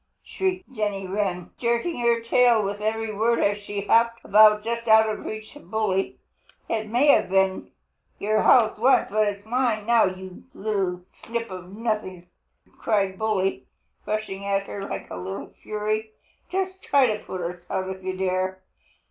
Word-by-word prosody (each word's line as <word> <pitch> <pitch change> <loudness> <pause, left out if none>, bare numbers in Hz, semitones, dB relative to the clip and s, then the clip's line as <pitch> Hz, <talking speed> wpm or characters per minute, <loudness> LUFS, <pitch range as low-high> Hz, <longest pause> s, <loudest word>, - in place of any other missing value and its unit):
shrieked 375 -5 -3
Jenny 205 -4 -2
Wren, 185 -2 -2
jerking 235 +6 0
her 235 -1 +2
tail 235 -1 +4
with 200 +1 -3
every 220 0 -2
word 230 +3 +2
as 205 0 +1
she 205 0 -5
hopped 230 +3 +2
about 210 +1 +6
just 230 +1 -3
out 220 0 +6
of 215 - -4
reach 215 +4 -7
of 295 - -15
Bully. 205 -3 -1 0.5
"It 220 -1 -2
may 245 +7 +3
have 185 - +5
been 190 0 +1 0.5
your 215 +1 +1
house 225 -4 +4
once, 255 -1 +3
but 215 0 +2
it 205 -1 -2
is 200 - -23
mine 235 -3 0
now, 235 0 +5
you 185 -1 -6
little 195 -4 -2 0.2
snip 230 -2 -4
of 185 +1 -9
nothing!" 210 -6 -3 0.5
cried 195 -3 0
Bully, 205 -3 -1 0.4
rushing 210 -2 -3
at 200 0 0
her 200 - -6
like - - -5
a - - -5
little 190 +2 -6
fury. 215 +1 -2 0.4
"Just 380 0 -2
try 280 -2 +4
to 215 -3 0
put 185 - -6
us 175 +1 -5
out 185 - -2
if 190 0 -8
you 185 0 -3
dare! 185 0 -1
215 Hz, 170 wpm, -24 LUFS, 195-230 Hz, 0.5 s, about